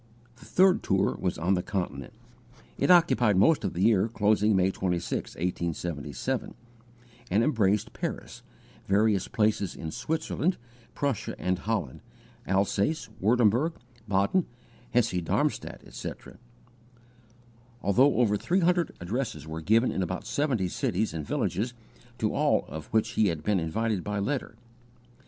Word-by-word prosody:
The - - -15
third 185 0 +4
tour 95 0 +1
was 90 -2 -1
on 90 +4 +1
the 90 - +1
Continent. 85 -9 -4 0.6
It - - 0
occupied 165 - +5
most 125 +11 +4
of - - -2
the 90 - -1
year 110 -2 +4
closing 105 -1 +2
May 95 0 +3
26, 90 -2 -2
1877, 85 -4 -3 0.7
and 105 +5 +3
embraced 105 -7 +1
Paris, - - -5 0.5
various 105 0 +2
places 105 -5 0
in 80 -1 -6
Switzerland, 160 - -1 0.4
Prussia 140 -7 -2
and 90 0 0
Holland, 100 - -3 0.5
Alsace, 100 - 0
Wurtemberg, 120 - +3 0.3
Baden, 100 - +2 0.4
Hesse 115 -7 +1
Darmstadt, 80 - -1
etc. - - -8 1.4
Altogether 130 +9 +4
over 105 -4 +3
three 185 - +1
hundred 175 0 +1
addresses 90 - -3
were 80 +1 -6
given 115 +8 +3
in - - -2
about 90 0 -3
seventy 130 -10 0
cities 95 +4 -1
and 75 -3 -5
villages 120 +4 -1 0.4
to 110 - 0
all - - +2
of 80 -1 -7
which 110 0 +1
he 110 -2 +2
had 80 -4 -2
been 105 -3 +2
invited 100 +5 -1
by 105 0 -3
letter. 120 +3 -2
105 Hz, 135 wpm, -28 LUFS, 90-120 Hz, 1.4 s, occupied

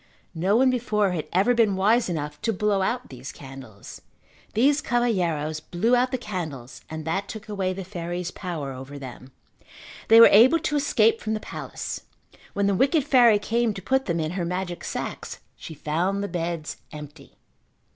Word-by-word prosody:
No 185 +5 +1
one 260 +2 +4
before 215 -5 0
had 165 -4 -3
ever 195 +7 +3
been 225 -5 +3
wise 215 +4 +2
enough 150 -3 -4
to 225 - 0
blow 205 -1 0
out 245 +6 -2
these 130 0 -8
candles. 130 -7 -11 0.5
These 280 +6 +3
cavalheiros 175 -11 0
blew 220 +10 +1
out 250 +1 +2
the 255 - -2
candles 155 - -6
and 160 -1 -6
that 195 +5 -2
took 220 0 -8
away 195 -3 -2
the 190 +1 -6
fairy's 175 -1 -5
power 160 -8 -5
over 135 +2 -9
them. 130 -1 -10 0.8
They 225 +1 +8
were 230 - +11
able 240 +10 +7
to 300 - -2
escape 230 -6 +2
from 220 0 -2
the - - -3
palace. - - -6 0.5
When 200 - 0
the 200 - +2
wicked 275 - +2
fairy 245 -6 +5
came 230 +1 0
to 195 - -6
put 265 0 +1
them 170 -2 -1
in 155 0 -2
her 180 0 -3
magic 175 0 -4
sacks - - -5 0.2
she 160 - -10
found 175 +7 -1
the - - -2
beds 170 -4 -4
empty. 150 -1 -11
190 Hz, 175 wpm, -25 LUFS, 160-225 Hz, 0.8 s, were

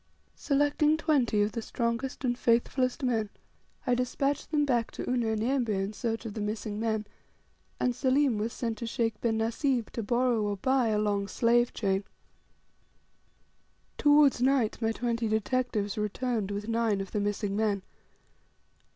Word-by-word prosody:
Selecting 290 +2 +2
twenty 270 -10 +2
of 210 - -1
the 230 - -4
strongest 235 +4 -2
and 245 -1 +1
faithfulest 245 +2 +1
men 225 -4 0 0.6
I 250 - +2
despatched 265 +3 -1
them 295 -1 +2
back 240 -4 +1
to - - -6
Unyanyembe 240 +1 0
in 195 0 -1
search 225 +1 -3
of 220 - -5
the 215 - -4
missing 210 0 -3
men; 220 -1 -1 0.7
and 250 - +1
Selim 260 -2 +2
was 220 +2 -1
sent 230 -3 -3
to 235 - -4
Sheikh 225 -2 -1
bin 225 -2 +1
Nasib 235 +2 0
to 230 - -3
borrow, 240 +1 +1
or 205 -1 -1
buy, 260 +3 +2
a 215 -1 +1
long 205 -1 0
slave 240 +4 +2
chain. 195 -2 0 2.0
Towards 290 -3 +5
night 255 -4 +2
my 225 0 +1
twenty 230 0 -1
detectives 220 -1 -1
returned 215 0 -1
with 205 +1 -4
nine 230 -3 +1
of 195 -1 -5
the 210 - -1
missing 205 0 -1
men. 205 -2 0
230 Hz, 150 wpm, -29 LUFS, 210-255 Hz, 2.0 s, Towards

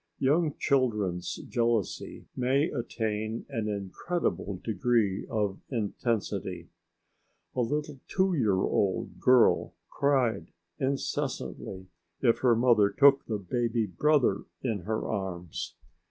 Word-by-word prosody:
Young 150 +3 +2
children's 105 -10 0
jealousy 115 -5 -1
may 135 +6 +2
attain 110 -3 -3
an 115 -6 -2
incredible 100 - -2
degree 110 -2 +1
of 105 -4 -1
intensity. 115 -1 -2 0.9
A 125 - +1
little 145 +3 -2
two 190 0 +2
year 105 - +2
old 95 -1 0
girl 125 -2 +4 0.2
cried 125 - +1 0.3
incessantly 130 -7 -3 0.3
if 115 -3 +3
her 125 -3 +4
mother 115 -4 +4
took 140 +3 +5
the 110 - -1
baby 115 +3 0
brother 120 - +2 0.2
in 115 -5 -1
her 110 +1 -2
arms. 90 -5 -4
115 Hz, 105 wpm, -29 LUFS, 100-135 Hz, 0.9 s, took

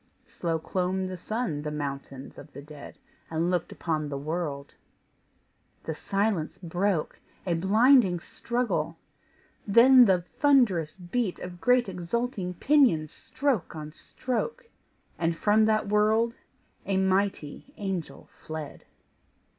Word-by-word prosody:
Slow 165 -2 -2
clomb 185 +3 -2
the 185 0 -5
sun 215 -4 -3
the 150 - -4
mountains 140 -2 -6
of 150 - -13
the 140 - -8
dead, 150 -1 -11 0.3
And 165 +2 0
looked 175 -2 -1
upon 155 -3 -2
the 140 - -4
world: 145 -1 -4 1.1
the 160 - -3
silence 195 -1 -1
broke! 175 -1 -1 0.3
A 175 - 0
blinding 200 +2 +4
struggle! 195 -7 -2 0.7
then 245 +4 +8
the 185 -4 +3
thunderous 200 - +2
beat 190 +2 -2
Of 180 0 -9
great 250 -1 +3
exulting 190 +1 -3
pinions 235 - +3
stroke 260 -11 -2
on 155 -1 -7
stroke! 460 - -4 0.5
And 165 0 0
from 215 +3 +3
that 215 -1 +1
world 215 +3 +2 0.5
a 195 -1 -1
mighty 190 - -1
angel 190 -5 -5
fled. 155 -2 -8
185 Hz, 120 wpm, -27 LUFS, 160-220 Hz, 1.1 s, then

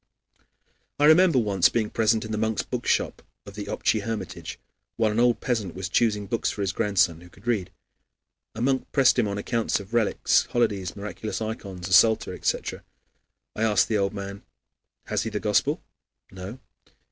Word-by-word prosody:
I 145 - +5
remember 165 0 +6
once 100 -6 +3
being 110 -2 -1
present 110 0 +2
in 110 - -6
the 110 - -1
monks' 110 -1 0
bookshop - - -1 0.2
of 100 - -10
the 105 0 -6
Optchy 110 - 0
Hermitage 110 +1 -5 0.4
while 110 -2 +2
an 110 - 0
old 120 0 +3
peasant 110 -9 -2
was 90 -1 -4
choosing 105 -3 +1
books 115 +4 -1
for 105 - -4
his 95 -1 0
grandson, 90 -5 +1
who 90 - -14
could - - -20
read. 100 -6 -1 0.8
A 115 - -3
monk 130 0 0
pressed 130 -2 +4
on 115 - +2
him 100 0 -3
accounts 115 +2 0
of 100 +3 -11
relics, 115 -3 +2
holidays, 100 -7 0
miraculous 105 +1 -5
ikons, 100 -5 -5
a 90 - -2
psalter, 110 +3 +5
etc. - - -2 0.7
I - - -4
asked 105 -4 +3
the 110 - +2
old 100 +1 -1
man, 100 0 -6 0.6
"Has - - -1
he - - -3
the - - -3
Gospel?" - - +1 0.5
"No." 95 +5 -8
105 Hz, 175 wpm, -25 LUFS, 100-115 Hz, 0.8 s, remember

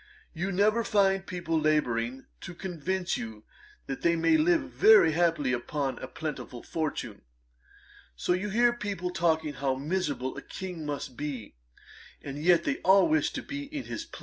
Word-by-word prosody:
You 180 +4 -2
never 215 +5 +3
find 195 -2 +2
people 170 -4 -1
labouring 130 -5 0
to 175 - -8
convince 185 0 -2
you 110 -2 -7 0.4
that 135 - -5
you 170 0 +3
may 320 - +4
live 325 +1 +4
very 430 - +6
happily 160 -5 +1
upon 135 +3 -2
a 130 - -6
plentiful 135 -5 -6
fortune. 160 -2 -4 0.9
So 120 - 0
you 190 +4 -2
hear 240 +4 +3
people 200 -6 -4
talking 160 -4 +1
how 135 -1 -1
miserable 145 -3 -2
a - - -5
King 180 -5 -7
must 140 -3 -4
be; 130 -6 -5 0.7
and 140 0 -7
yet 170 -1 +5
they 280 - 0
all 190 +1 +5
wish 315 0 +2
to - - -4
be 285 0 -5
in 290 -1 -6
his 330 - -6
place.' 335 - -11
170 Hz, 165 wpm, -28 LUFS, 145-195 Hz, 0.9 s, very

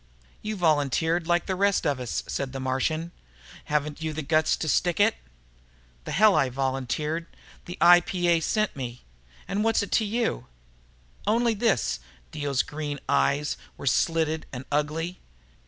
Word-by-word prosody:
"You 215 0 -3
volunteered, 160 0 +1
like 175 0 +2
the 190 - -1
rest 200 +1 +2
of 140 -3 +1
us," 125 -3 -3
said 135 -2 -3
the 135 - -4
Martian. 145 +6 -1 0.5
"Haven't 150 0 -1
you 160 -1 -2
the 155 0 -4
guts 155 +2 +2
to 160 - -3
stick 175 +4 +1
it?" 215 +2 +5 0.9
"The - - -5
hell 215 0 +5
I 135 - +3
volunteered! 135 +5 -2 0.4
The 175 - -7
IPA 175 -1 +5
sent 215 +5 0
me. 125 -3 -6 0.4
And 205 +2 -1
what's 225 -1 +2
it 200 - -7
to 225 - +3
you?" 210 - -1 0.8
"Only 230 +2 +3
this." 195 - +1 0.3
Dio's 140 -3 0
green 145 -1 -5
eyes 145 +1 +1 0.2
were - - -8
slitted 160 +3 +1
and 130 0 -7
ugly. 155 +4 -1
160 Hz, 150 wpm, -26 LUFS, 140-180 Hz, 0.9 s, it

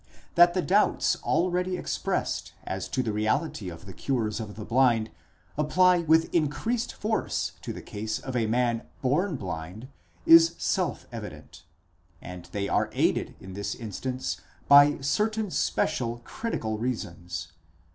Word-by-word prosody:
That 175 +1 +6
the 185 - +1
doubts 205 +3 +3
already 180 +1 0
expressed - - -2
as - - -4
to 130 - -1
the 110 -3 -2
reality 110 - -1
of 85 +2 -10
the 95 - -9
cures 115 -1 -1
of 105 -2 -6
the 110 - -7
blind, 115 -3 +3 0.5
apply 180 +4 +4
with 160 0 +3
increased 170 - 0
force 220 +1 -1
to - - -5
the - - -8
case 110 +1 -4
of 130 -1 -6
a 115 -3 +1
man 120 0 +1 0.2
born 160 +7 +1
blind, 95 +3 -6 0.4
is 165 0 +8
self 180 -6 -1
evident. 90 -6 -9 0.5
And 90 -1 -9
they 100 -1 -3
are - - +1
aided - - +1
in 95 0 -10
this 100 +1 -3
instance 125 +4 -4 0.3
by 145 +1 +7
certain 210 +7 0
special 120 -9 0
critical 110 - -3
reasons. 90 -8 -4
125 Hz, 140 wpm, -27 LUFS, 105-170 Hz, 0.5 s, is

